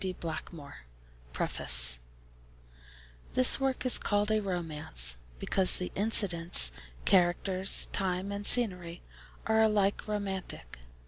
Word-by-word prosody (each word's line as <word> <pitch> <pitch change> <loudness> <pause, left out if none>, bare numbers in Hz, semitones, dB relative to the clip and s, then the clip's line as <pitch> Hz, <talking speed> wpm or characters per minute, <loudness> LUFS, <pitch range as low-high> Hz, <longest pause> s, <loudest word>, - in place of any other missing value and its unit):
D. 185 -1 -4
Blackmore 160 -3 -9 0.5
Preface 60 0 -1 1.3
This 255 +1 +5
work 270 -1 -3
is 255 - +5
called 205 0 -2
a 215 0 0
'romance,' 155 - -2 0.2
because 185 - +2
the 180 - -6
incidents, 175 - +2 0.3
characters, 185 +1 +2
time, 190 +1 -4
and 200 0 -6
scenery, 180 -7 +3 0.4
are 220 0 +1
alike 210 -2 -1
romantic. 190 - -6
185 Hz, 105 wpm, -28 LUFS, 165-205 Hz, 1.3 s, This